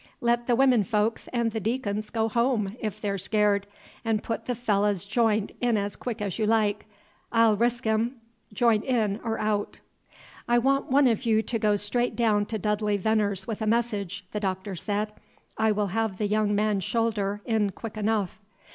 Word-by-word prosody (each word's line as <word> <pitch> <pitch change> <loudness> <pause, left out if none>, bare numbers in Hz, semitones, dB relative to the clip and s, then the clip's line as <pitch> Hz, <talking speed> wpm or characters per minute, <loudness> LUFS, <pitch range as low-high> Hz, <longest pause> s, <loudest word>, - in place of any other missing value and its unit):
"Let 240 0 +1
the 245 - +3
women 255 -3 +4
folks 210 +3 0
and 235 -2 0
the 220 - -2
deacons 215 -1 -2
go 225 -1 0
home, 225 -3 0
if 215 -1 -4
they're 200 -2 -2
scared, 205 0 +1 0.4
and 225 -2 0
put 225 - -4
the 245 - 0
fellah's 205 -5 +1
j'int 215 -1 +1
in 240 -3 +2
as 200 0 -2
quick 230 -4 -4
as 200 +1 -3
you 215 - +1
like. 215 -2 +1 0.4
I 230 0 +5
'll 220 -2 +4
resk 240 +3 0
him, 220 +3 +1 0.4
j'int 220 0 +2
in 220 -5 0
or 225 -2 -1
out." 210 -1 -1 0.7
"I 240 - +4
want 275 +3 +1
one 275 +2 +5
of 235 0 +1
you 220 -1 +3
to 230 0 -2
go 210 -1 +3
straight 240 +4 -1
down 210 -3 +2
to 220 - -3
Dudley 210 0 0
Venner's 200 -1 0
with 225 -1 -5
a 215 - -1
message," 215 -5 -1
the 210 - -2
Doctor 190 0 -3
said. 210 +3 -2 0.4
"I 220 0 +2
will 205 -1 0
have 220 -3 -1
the 210 - -1
young 210 0 +1
man's 210 -2 +1
shoulder 210 -2 -1
in 220 -3 +1
quick 225 +3 -8
enough." 210 -3 -1
215 Hz, 190 wpm, -26 LUFS, 205-230 Hz, 0.7 s, I